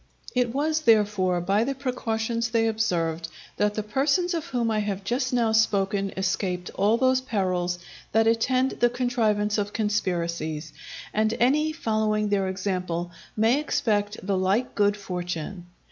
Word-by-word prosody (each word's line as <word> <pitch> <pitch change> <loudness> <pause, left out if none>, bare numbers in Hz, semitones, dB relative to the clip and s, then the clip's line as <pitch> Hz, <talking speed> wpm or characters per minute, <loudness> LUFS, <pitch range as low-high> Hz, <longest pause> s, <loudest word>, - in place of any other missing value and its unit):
It 250 -2 +1
was, 305 +4 0
therefore, 205 - +3
by 195 +5 +2
the 275 +3 -2
precautions 230 -3 -2
they 225 0 +2
observed, 170 -7 0 0.3
that 210 0 +1
the 215 - -2
persons 285 - +1
of 335 -1 -3
whom 240 -6 0
I 215 - +1
have 200 -2 -2
just 250 +5 -1
now 235 -3 +2
spoken 200 -2 +2
escaped 185 -1 -1
all 210 +3 +2
those 260 +1 +3
perils 185 -7 -1 0.3
that 225 +1 +3
attend 255 +3 +2
the 240 - +4
contrivance 225 -4 0
of 205 0 -3
conspiracies; 170 -7 -2 0.4
and 215 +1 +1
any 300 +6 +3
following 215 -7 0
their 195 -2 +1
example 180 -2 -2 0.3
may 225 +6 +3
expect 210 -8 0
the 195 -1 +1
like 200 +7 +1
good 205 -1 +2
fortune. 180 -2 -5
215 Hz, 145 wpm, -25 LUFS, 190-240 Hz, 0.4 s, the